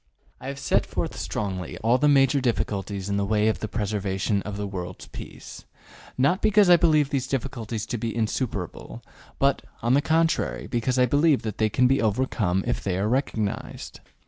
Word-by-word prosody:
I -, -, -8 dB
have 140 Hz, 0 st, -5 dB
set -, -, +1 dB
forth -, -, -3 dB
strongly 95 Hz, -4 st, -4 dB
all 120 Hz, +3 st, +3 dB
the 150 Hz, -, +3 dB
major 140 Hz, -1 st, +4 dB
difficulties 100 Hz, -5 st, -2 dB
in 100 Hz, 0 st, -1 dB
the 100 Hz, -, +1 dB
way 105 Hz, +1 st, +2 dB
of 110 Hz, -, -1 dB
the 110 Hz, -, -3 dB
preservation 100 Hz, -1 st, -1 dB
of 100 Hz, 0 st, -6 dB
the 105 Hz, -, -3 dB
world's 90 Hz, -2 st, -6 dB
peace, -, -, -10 dB, 0.5 s
not 140 Hz, +9 st, +2 dB
because 210 Hz, -3 st, +5 dB
I -, -, +10 dB
believe 155 Hz, -4 st, +3 dB
these 135 Hz, -2 st, -1 dB
difficulties 120 Hz, -5 st, -3 dB
to 120 Hz, -, -4 dB
be 115 Hz, 0 st, -3 dB
insuperable, 110 Hz, -5 st, -3 dB, 0.3 s
but, 140 Hz, 0 st, +2 dB, 0.2 s
on 120 Hz, +2 st, +3 dB
the 140 Hz, -, +4 dB
contrary, 165 Hz, +1 st, +1 dB
because 120 Hz, +1 st, -1 dB
I 125 Hz, -, +5 dB
believe 145 Hz, +3 st, +3 dB
that 110 Hz, -2 st, -5 dB
they 110 Hz, 0 st, +3 dB
can 125 Hz, +4 st, +2 dB
be 135 Hz, +2 st, +3 dB
overcome 105 Hz, -4 st, 0 dB
if -, -, -2 dB
they 95 Hz, -2 st, -1 dB
are 100 Hz, +2 st, 0 dB
recognized. 110 Hz, -4 st, -2 dB
115 Hz, 185 wpm, -25 LUFS, 100-135 Hz, 0.5 s, I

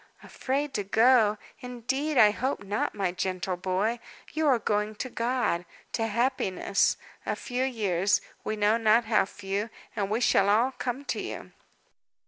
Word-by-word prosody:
"Afraid 275 Hz, +2 st, -2 dB
to 205 Hz, -, -1 dB
go! 220 Hz, +1 st, +4 dB, 0.2 s
Indeed 255 Hz, +4 st, -2 dB
I 210 Hz, -3 st, +7 dB
hope 255 Hz, +1 st, -2 dB
not, 205 Hz, +2 st, -2 dB
my 195 Hz, -3 st, 0 dB
gentle 185 Hz, 0 st, -2 dB
boy. 190 Hz, +6 st, -1 dB, 0.3 s
You 315 Hz, 0 st, +1 dB
are 265 Hz, -3 st, +5 dB
going 210 Hz, -1 st, -1 dB
to 255 Hz, +4 st, -5 dB
God 235 Hz, -7 st, 0 dB, 0.3 s
to 225 Hz, -1 st, 0 dB
happiness. 225 Hz, -4 st, +1 dB, 0.3 s
A -, -, -2 dB
few 250 Hz, 0 st, -3 dB
years 205 Hz, -7 st, +1 dB, 0.2 s
we 215 Hz, -, -2 dB
know 210 Hz, +1 st, +3 dB
not 225 Hz, +1 st, +4 dB
how 220 Hz, -3 st, +3 dB
few 200 Hz, +2 st, -4 dB, 0.3 s
and 200 Hz, -3 st, -1 dB
we 215 Hz, +2 st, 0 dB
shall 200 Hz, -4 st, +3 dB
all 230 Hz, +6 st, +3 dB
come 260 Hz, +2 st, -4 dB
to -, -, -2 dB
you." -, -, -7 dB
220 Hz, 155 wpm, -28 LUFS, 200-250 Hz, 0.3 s, I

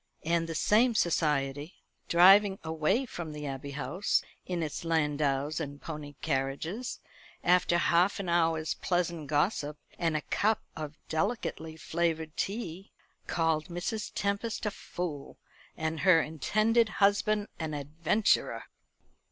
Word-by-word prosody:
And 165 Hz, 0 st, +1 dB
the 165 Hz, -, -3 dB
same 225 Hz, +7 st, +3 dB
society, 150 Hz, -3 st, 0 dB, 0.3 s
driving 195 Hz, +3 st, +7 dB
away 160 Hz, -, +1 dB
from 170 Hz, -9 st, -6 dB
the 150 Hz, 0 st, -6 dB
Abbey 135 Hz, 0 st, -5 dB
House 170 Hz, +8 st, 0 dB, 0.2 s
in 175 Hz, -2 st, -1 dB
its 155 Hz, +1 st, -4 dB
landaus 150 Hz, -2 st, 0 dB
and 145 Hz, -2 st, -5 dB
pony 150 Hz, -2 st, -7 dB
carriages, 155 Hz, -, -2 dB, 0.4 s
after 175 Hz, -1 st, +4 dB
half 175 Hz, +3 st, +3 dB
an 195 Hz, -, -4 dB
hour's 165 Hz, -2 st, +2 dB
pleasant 170 Hz, -4 st, -1 dB
gossip 150 Hz, 0 st, 0 dB, 0.2 s
and 165 Hz, -3 st, +1 dB
a -, -, -3 dB
cup 215 Hz, +8 st, 0 dB
of 155 Hz, -1 st, -6 dB
delicately 160 Hz, -3 st, -2 dB
flavoured 160 Hz, -1 st, -1 dB
tea, 195 Hz, -3 st, -4 dB, 0.4 s
called 160 Hz, -2 st, +1 dB
Mrs. 180 Hz, +5 st, -4 dB
Tempest 200 Hz, +3 st, -1 dB
a 210 Hz, -, 0 dB
fool, 165 Hz, -7 st, -6 dB, 0.4 s
and 160 Hz, 0 st, -2 dB
her 180 Hz, -3 st, +6 dB
intended 215 Hz, +9 st, +2 dB
husband 205 Hz, +1 st, +3 dB
an 155 Hz, -2 st, -3 dB
adventurer. 160 Hz, +9 st, +1 dB
165 Hz, 125 wpm, -30 LUFS, 155-195 Hz, 0.4 s, driving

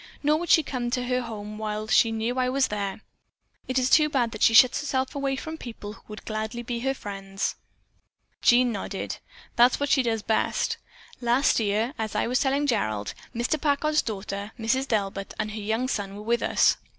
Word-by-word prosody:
Nor 300 Hz, +1 st, +3 dB
would 345 Hz, -1 st, -5 dB
she 320 Hz, -, +6 dB
come 250 Hz, -3 st, -3 dB
to 250 Hz, +1 st, -1 dB
her 250 Hz, 0 st, 0 dB
home 215 Hz, -2 st, -7 dB
while 215 Hz, 0 st, -3 dB
she 225 Hz, +1 st, +4 dB
know 225 Hz, +2 st, -1 dB
that 260 Hz, -, -3 dB
I 255 Hz, 0 st, +2 dB
was 270 Hz, +1 st, +1 dB
there. 200 Hz, 0 st, -3 dB, 0.7 s
It 255 Hz, -, -1 dB
is 255 Hz, -1 st, +3 dB
too 300 Hz, +3 st, +5 dB
bad 245 Hz, -5 st, +1 dB
that 215 Hz, -, -8 dB
she 225 Hz, -, +5 dB
shuts 250 Hz, +1 st, +7 dB
herself 260 Hz, -2 st, -1 dB
away 275 Hz, -2 st, -1 dB
from 315 Hz, +4 st, -6 dB
people 215 Hz, -4 st, -8 dB
who -, -, -16 dB
would 210 Hz, 0 st, -10 dB
gladly 220 Hz, +2 st, -4 dB
be 240 Hz, 0 st, -3 dB
her 270 Hz, +2 st, -1 dB
friends." 195 Hz, -3 st, -4 dB, 0.9 s
Jean 245 Hz, 0 st, +5 dB
nodded. 200 Hz, -2 st, -4 dB, 0.4 s
"That 240 Hz, -, +8 dB
is -, -, -6 dB
just -, -, -2 dB
what 285 Hz, 0 st, -1 dB
she 275 Hz, -, +4 dB
does. 225 Hz, -3 st, -1 dB, 1.0 s
Last 240 Hz, +3 st, +3 dB
year, 220 Hz, +4 st, 0 dB
as 220 Hz, -1 st, -3 dB
I 210 Hz, -, +1 dB
was 250 Hz, +3 st, +1 dB
telling 275 Hz, +1 st, +1 dB
Gerald, 110 Hz, -, -1 dB, 0.2 s
Mr. 245 Hz, +6 st, 0 dB
Packard's 300 Hz, +1 st, +2 dB
daughter, 200 Hz, -1 st, -5 dB
Mrs. 255 Hz, +4 st, 0 dB
Delbert, 195 Hz, -3 st, -2 dB
and 215 Hz, 0 st, -2 dB
her 215 Hz, 0 st, -5 dB
young 220 Hz, +5 st, -1 dB
son 200 Hz, -6 st, -3 dB
were 210 Hz, -, -8 dB
with 235 Hz, +2 st, +1 dB
us. -, -, +3 dB
235 Hz, 205 wpm, -26 LUFS, 215-260 Hz, 1.0 s, That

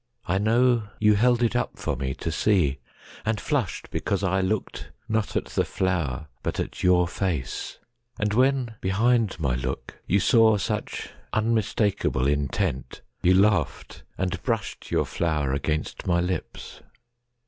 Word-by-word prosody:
I 95 Hz, -, +1 dB
know, 115 Hz, +1 st, +3 dB
you 105 Hz, 0 st, +5 dB
held 120 Hz, +3 st, +3 dB
it 115 Hz, -, +1 dB
up -, -, -1 dB
for -, -, -2 dB
me 65 Hz, 0 st, -3 dB
to -, -, -4 dB
seeAnd 90 Hz, -, -1 dB
flushed 135 Hz, -, -2 dB
because 100 Hz, 0 st, -1 dB
I 95 Hz, 0 st, +2 dB
looked 95 Hz, +2 st, -2 dB, 0.2 s
not 110 Hz, -1 st, -1 dB
at -, -, 0 dB
the -, -, 0 dB
flower, 85 Hz, -7 st, -1 dB, 0.2 s
But -, -, -3 dB
at -, -, -4 dB
your 90 Hz, -1 st, +4 dB
face; 85 Hz, -8 st, -3 dB, 0.4 s
and 105 Hz, -1 st, 0 dB
when 130 Hz, -1 st, +2 dB
behind 110 Hz, +2 st, +2 dB
my 70 Hz, -6 st, 0 dB
lookYou 65 Hz, +9 st, -2 dB
saw 110 Hz, +1 st, +5 dB
such 95 Hz, -, -3 dB, 0.2 s
unmistakable 110 Hz, -, +1 dB
intentYou 70 Hz, -2 st, 0 dB, 0.5 s
laughed 100 Hz, -6 st, +1 dB, 0.2 s
and 95 Hz, -1 st, -2 dB
brushed 115 Hz, -4 st, -3 dB
your -, -, +1 dB
flower 75 Hz, -5 st, -1 dB
against 75 Hz, +3 st, -2 dB
my 85 Hz, -1 st, +3 dB
lips. 90 Hz, -1 st, -4 dB
95 Hz, 135 wpm, -25 LUFS, 80-110 Hz, 0.5 s, you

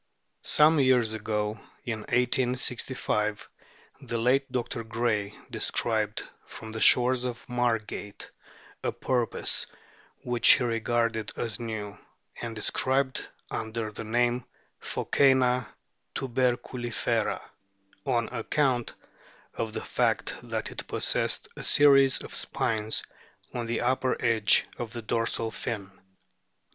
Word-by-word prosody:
Some 155 Hz, +1 st, +5 dB
years 125 Hz, -5 st, +4 dB
ago 105 Hz, 0 st, -2 dB, 0.3 s
(in 115 Hz, -3 st, -2 dB
1865) 125 Hz, -3 st, 0 dB, 0.5 s
the 120 Hz, -, -3 dB
late 130 Hz, +4 st, +2 dB
Dr. 125 Hz, -1 st, -2 dB
Gray 110 Hz, -3 st, -1 dB, 0.2 s
descried -, -, 0 dB, 0.2 s
from 110 Hz, -, -9 dB
the 110 Hz, -, -4 dB
shores 125 Hz, 0 st, +5 dB
off 125 Hz, -1 st, -5 dB
Margate 115 Hz, -4 st, -2 dB, 0.5 s
a -, -, 0 dB
porpoise, 125 Hz, -3 st, 0 dB, 0.6 s
which 120 Hz, -1 st, +6 dB
he -, -, +1 dB
regarded 115 Hz, -1 st, 0 dB
as 110 Hz, -3 st, -3 dB
new, 105 Hz, -3 st, -5 dB, 0.4 s
and 115 Hz, -1 st, -5 dB
described 130 Hz, +4 st, 0 dB, 0.2 s
under 110 Hz, -1 st, -3 dB
the 110 Hz, -, -7 dB
name 120 Hz, +2 st, +1 dB, 0.4 s
of -, -, -5 dB
P/ioccena 130 Hz, -2 st, +4 dB, 0.5 s
tiLberculifera, 125 Hz, -2 st, -1 dB, 0.6 s
on 115 Hz, +1 st, +1 dB
account 125 Hz, 0 st, 0 dB, 0.6 s
of 110 Hz, -1 st, -3 dB
the -, -, -5 dB
fact -, -, 0 dB
that -, -, -4 dB
it -, -, -7 dB
possessed -, -, +1 dB
"a -, -, -7 dB
series 135 Hz, -2 st, +5 dB
of -, -, -9 dB
spines 110 Hz, -1 st, -1 dB, 0.5 s
on 120 Hz, -2 st, -3 dB
the 115 Hz, 0 st, -1 dB
upper 130 Hz, +1 st, +1 dB
edge" 115 Hz, -3 st, +4 dB
of 115 Hz, -2 st, -5 dB
the 120 Hz, -2 st, -6 dB
dorsal 115 Hz, 0 st, -1 dB
fin. 105 Hz, -4 st, -4 dB
Dr. 95 Hz, -, -27 dB
120 Hz, 115 wpm, -28 LUFS, 110-125 Hz, 0.6 s, which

